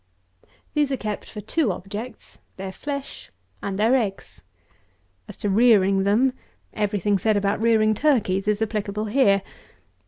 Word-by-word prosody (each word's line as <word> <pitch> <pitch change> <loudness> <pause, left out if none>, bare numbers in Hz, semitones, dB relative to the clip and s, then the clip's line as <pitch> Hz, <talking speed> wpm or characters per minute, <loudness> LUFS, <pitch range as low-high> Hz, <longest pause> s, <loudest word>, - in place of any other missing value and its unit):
These 295 -2 +1
are 270 - 0
kept 210 -3 -5
for 210 - -8
two 280 - 0
objects; 205 +7 -8 0.2
their 190 0 -5
flesh 280 +6 -6 0.3
and 195 -1 -3
their 220 +4 +3
eggs. 210 -7 -3 0.9
As - - -10
to 210 - -3
rearing 195 -3 +4
them, 240 +6 +3 0.4
every 210 -1 -1
thing 200 +1 +1
said 215 +2 +2
about 200 +1 0
rearing 220 -1 +3
turkeys 210 -7 +1
is 210 +1 +1
applicable 210 -1 -3
here. 205 -4 +3
210 Hz, 145 wpm, -23 LUFS, 200-235 Hz, 0.9 s, rearing